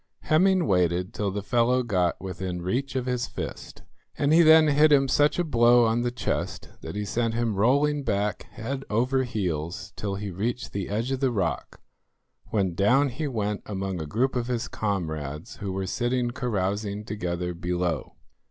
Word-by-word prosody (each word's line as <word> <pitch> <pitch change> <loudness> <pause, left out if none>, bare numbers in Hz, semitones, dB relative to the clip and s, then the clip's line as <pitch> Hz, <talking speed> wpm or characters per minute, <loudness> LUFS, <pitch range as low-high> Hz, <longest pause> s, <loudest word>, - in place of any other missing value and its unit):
Hemming 185 +3 +3
waited 90 -2 +1
till 105 -1 -1
the 100 +1 -4
fellow 125 +3 +2
got 90 -7 0
within 90 -1 -5
reach 130 +10 -2
of 130 -1 -1
his 125 -1 -1
fist, - - -7 0.3
and 145 +1 +2
he 165 - +7
then 160 -1 +7
hit 150 +2 +5
him 135 -2 +5
such 145 +3 +3
a 175 - +2
blow 120 -5 +5
on 115 +1 +1
the 120 - 0
chest 125 - -3
that - - -7
he 105 0 -2
sent 115 +2 -1
him 115 -2 0
rolling 140 +8 +2
back 105 -5 -1
head 135 +4 -5
over 125 +5 +1
heels 90 -7 -3
till 100 -2 -3
he 100 0 -5
reached 115 +7 -3
the 100 -2 -3
edge 115 +5 -1
of 135 - -1
the 135 -1 +2
rock, 100 -8 -2 0.7
when 95 -5 0
down 125 +10 +3
he 145 +5 -3
went 105 -5 -2
among 95 -3 -3
a 80 - -5
group 130 - 0
of 120 -1 -1
his 125 -1 -2
comrades, 80 -7 -4
who 100 -2 -4
were 95 0 -2
sitting 120 +5 -1
carousing 105 -3 -2
together 90 -4 -3
below. 85 -2 -2
110 Hz, 180 wpm, -26 LUFS, 95-125 Hz, 0.7 s, he